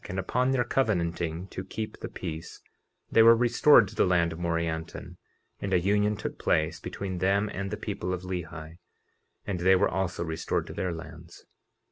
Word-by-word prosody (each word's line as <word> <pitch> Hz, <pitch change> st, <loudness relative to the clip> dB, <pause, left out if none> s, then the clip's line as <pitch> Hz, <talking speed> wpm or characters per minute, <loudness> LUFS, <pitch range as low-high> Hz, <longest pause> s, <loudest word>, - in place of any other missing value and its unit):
And 95 Hz, -, -4 dB
upon 125 Hz, +7 st, 0 dB
their 130 Hz, -2 st, +2 dB
covenanting 85 Hz, -8 st, -1 dB
to 95 Hz, -, -6 dB
keep 105 Hz, +3 st, -6 dB
the -, -, -6 dB
peace 80 Hz, 0 st, -7 dB, 0.5 s
they 115 Hz, -, +6 dB
were 115 Hz, +1 st, +8 dB
restored 120 Hz, 0 st, +5 dB
to -, -, -11 dB
the -, -, +3 dB
land 85 Hz, -2 st, +2 dB
of 80 Hz, -, -9 dB
Morianton, 85 Hz, -1 st, -3 dB, 0.4 s
and 100 Hz, -1 st, -3 dB
a -, -, +4 dB
union 105 Hz, +3 st, +1 dB
took -, -, -6 dB
place -, -, +1 dB
between 95 Hz, -2 st, -5 dB
them 100 Hz, +3 st, +2 dB
and 100 Hz, +1 st, -3 dB
the 105 Hz, -, -4 dB
people 100 Hz, -3 st, -4 dB
of 90 Hz, -1 st, -3 dB
Lehi; 85 Hz, -3 st, -6 dB, 0.7 s
and 95 Hz, -3 st, -3 dB
they 95 Hz, +2 st, +5 dB
were 100 Hz, +2 st, +3 dB
also 95 Hz, -2 st, -2 dB
restored 80 Hz, -1 st, -2 dB
to -, -, -8 dB
their 90 Hz, -, -2 dB
lands. 80 Hz, -1 st, -10 dB
95 Hz, 180 wpm, -28 LUFS, 85-105 Hz, 0.7 s, were